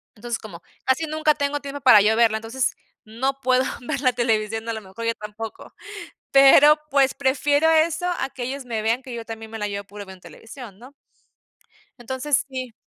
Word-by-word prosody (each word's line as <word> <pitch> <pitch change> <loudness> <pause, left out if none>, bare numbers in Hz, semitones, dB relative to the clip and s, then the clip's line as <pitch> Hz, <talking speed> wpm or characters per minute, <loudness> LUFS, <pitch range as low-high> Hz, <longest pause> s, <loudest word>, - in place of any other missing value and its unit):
Entonces, 235 +1 -4
como 180 -6 -11 0.2
casi 265 +5 +1
nunca 310 0 +1
tengo 285 0 -2
tiempo 280 0 -7
para 215 -4 +7
yo 215 +2 +3
verla 225 -1 +3
entonces, 230 +4 -2 0.3
no 265 +5 -3
puedo 255 0 +2 0.2
ver 250 +2 -4
la 255 -3 +2
televisión 225 -2 -1
a - - -1
lo 220 - -6
mejor 195 +3 -9
yo 230 - +1
tampoco, 215 +1 -9 0.6
pero 275 +2 +7
pues 275 -1 +3
prefiero 285 +3 +2
eso 325 +2 +2
a 265 - -2
que 255 - -8
ellos 270 +2 -5
me 225 -3 -3
vean 230 +4 0
que 255 -2 -9
yo 230 -1 -6
también 225 -1 -9
me 225 - -6
la 210 -1 -2
llevo 200 0 -5
puro 205 0 -10
viendo 190 -1 -12
televisión, 220 - -12
¿no? 255 +4 -14 1.1
Entonces 260 +4 -1
sí. 255 -2 -6
245 Hz, 190 wpm, -22 LUFS, 220-275 Hz, 1.1 s, para